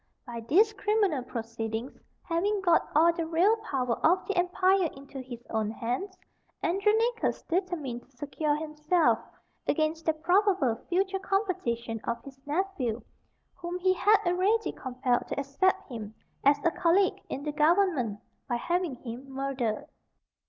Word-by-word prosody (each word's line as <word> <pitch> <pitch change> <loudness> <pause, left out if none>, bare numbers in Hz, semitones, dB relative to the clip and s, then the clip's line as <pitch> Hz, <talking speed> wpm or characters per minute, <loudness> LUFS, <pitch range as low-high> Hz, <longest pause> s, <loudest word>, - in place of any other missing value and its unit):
By 240 -2 -6
these 395 - +4
criminal 410 -7 +1
proceedings 230 0 -5 0.3
having 395 +5 0
got 345 -3 +3
all 335 +3 +6
the 335 -1 -3
real 350 +7 +4
power 265 - -2
of 360 +4 +4
the 405 - -2
empire 365 0 +3
into 275 0 -9
his 245 -2 -9
own 220 -1 0
hands, 250 - -3 0.5
Andronicus 440 +6 +1
determined 330 -9 -2
to 265 - -31
secure 295 +2 -1
himself 305 +2 +1 0.5
against 315 +2 0
the 320 - +4
probable 355 - +2
future 385 +2 +1
competition 245 - -1
of 235 0 -2
his 270 -1 -12
nephew, 290 - -1 0.5
whom 350 0 -5
he 370 +1 +3
had 415 +3 +5
already 380 +6 +2
compelled 250 -1 -1
to - - -3
accept 280 +8 +1
him 220 -4 -7 0.3
as 280 +1 +5
a 335 - +4
colleague 380 +4 +2
in 275 - -4
the 300 - -2
government, 300 - +2 0.3
by 240 - +1
having 345 +3 -1
him 250 +2 -8
murdered. 265 -5 -2
320 Hz, 140 wpm, -29 LUFS, 255-375 Hz, 0.5 s, all